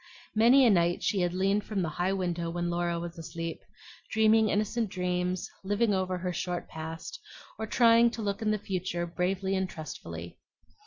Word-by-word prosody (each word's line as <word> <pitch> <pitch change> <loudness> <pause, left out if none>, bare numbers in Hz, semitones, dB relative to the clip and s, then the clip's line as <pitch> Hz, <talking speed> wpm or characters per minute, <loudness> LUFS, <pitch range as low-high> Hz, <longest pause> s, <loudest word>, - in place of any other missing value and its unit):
Many 240 +5 +6
a 235 - +6
night 175 -2 +2
she 200 - +1
had 175 -1 +1
leaned 195 +3 +1
from 200 -4 -2
the 165 - -1
high 185 +2 +2
window 175 -3 -2
when 175 0 -2
Laura 170 0 -1
was 170 0 -6
asleep, 165 0 -5 0.5
dreaming 220 0 +4
innocent 215 +2 0
dreams, 180 -1 -1 0.2
living 205 +2 +1
over 185 -1 0
her 180 0 -3
short 180 0 -3
past, 160 - -7 0.4
or 220 - -3
trying 235 0 +5
to 230 -1 -6
look 200 0 -2
into 215 -1 +1
the - - -17
future 180 -2 -2
bravely 185 +3 -1
and 190 -1 -1
trustfully. 155 -2 -8
185 Hz, 175 wpm, -29 LUFS, 175-215 Hz, 0.5 s, Many